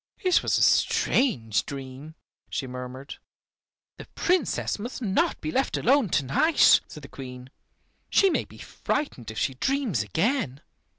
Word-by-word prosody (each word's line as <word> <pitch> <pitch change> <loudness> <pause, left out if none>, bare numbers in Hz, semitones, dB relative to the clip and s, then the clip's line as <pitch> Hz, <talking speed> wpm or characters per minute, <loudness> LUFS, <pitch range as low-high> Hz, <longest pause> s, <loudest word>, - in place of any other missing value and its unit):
It 365 -2 +4
was - - +1
a - - +3
strange 115 - +2
dream," 140 +3 -9 0.3
she 135 - -3
murmured. 125 +2 -8 0.8
"The - - -10
Princess 350 - 0
must 240 +5 -6
not 255 - 0
be 310 - -3
left 265 -1 0
alone 260 -3 +3
to 145 -4 +1
night," 305 - +5
said 150 - -11
the - - -9
Queen. 125 -1 -10 0.6
"She 390 -1 +4
may - - 0
be - - -16
frightened 280 - -4
if 110 - -8
she 135 - 0
dreams 245 - -1
again." 155 - -1
155 Hz, 150 wpm, -26 LUFS, -, 0.8 s, night